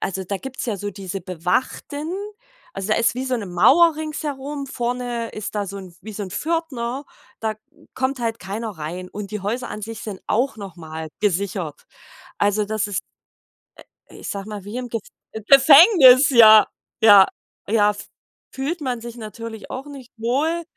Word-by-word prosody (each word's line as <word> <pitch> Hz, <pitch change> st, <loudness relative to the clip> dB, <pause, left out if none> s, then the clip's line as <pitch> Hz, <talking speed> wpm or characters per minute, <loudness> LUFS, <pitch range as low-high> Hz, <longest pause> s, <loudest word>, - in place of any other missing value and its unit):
also 190 Hz, 0 st, -3 dB
da 200 Hz, +2 st, -3 dB
gibt's 265 Hz, +4 st, -6 dB
ja 215 Hz, -4 st, -1 dB
so 205 Hz, +2 st, -4 dB
diese 195 Hz, 0 st, -6 dB
bewachten 250 Hz, -, -2 dB, 0.6 s
Also, 195 Hz, +2 st, -4 dB
da 215 Hz, -, +2 dB
ist 230 Hz, +1 st, +2 dB
wie 255 Hz, +1 st, -3 dB
so 260 Hz, -1 st, -1 dB
'ne 210 Hz, -4 st, -5 dB
Mauer 300 Hz, -, +5 dB
ringsherum, 290 Hz, -2 st, -5 dB
vorne 240 Hz, -2 st, -3 dB
ist 215 Hz, 0 st, -6 dB
da 205 Hz, -1 st, -1 dB
so 200 Hz, +1 st, -6 dB
'n 185 Hz, -3 st, -11 dB
wie 215 Hz, +1 st, -8 dB
so 205 Hz, -, -5 dB
'n 185 Hz, -, -9 dB
Pförtner, 285 Hz, -, -3 dB, 0.4 s
da 220 Hz, -1 st, -1 dB, 0.4 s
kommt 260 Hz, +1 st, -1 dB
halt 230 Hz, -1 st, -2 dB
keiner 210 Hz, +4 st, -5 dB
rein 175 Hz, +4 st, -6 dB
und 205 Hz, +1 st, -7 dB
die 210 Hz, -1 st, -4 dB
Häuser 235 Hz, +6 st, -3 dB
an 210 Hz, -, -6 dB
sich 225 Hz, +1 st, -7 dB
sind 200 Hz, -4 st, -7 dB
auch 250 Hz, +2 st, 0 dB
noch 195 Hz, -4 st, -8 dB
mal 160 Hz, -1 st, -7 dB
gesichert. 190 Hz, -5 st, -2 dB, 0.5 s
Also 205 Hz, +1 st, +1 dB
das 215 Hz, 0 st, -1 dB
ist, 195 Hz, -, -2 dB, 1.1 s
i -, -, -14 dB
ich -, -, -7 dB
sage 200 Hz, 0 st, -5 dB
mal, 205 Hz, -2 st, -7 dB
wie 210 Hz, +4 st, -7 dB
im 250 Hz, -1 st, -4 dB
Gef 230 Hz, -2 st, -3 dB, 0.5 s
Gefängnis, 275 Hz, -, +8 dB
ja, 220 Hz, -3 st, +8 dB, 0.4 s
ja, 205 Hz, -3 st, +9 dB, 0.4 s
ja 210 Hz, 0 st, +3 dB
f 205 Hz, -, -10 dB, 0.4 s
fühlt 295 Hz, +6 st, -3 dB
man 250 Hz, -4 st, -3 dB
sich 235 Hz, 0 st, -8 dB
natürlich 225 Hz, 0 st, -8 dB
auch 260 Hz, +2 st, -6 dB
nicht 270 Hz, -4 st, -11 dB
wohl 290 Hz, +9 st, 0 dB
225 Hz, 175 wpm, -22 LUFS, 200-260 Hz, 1.1 s, ja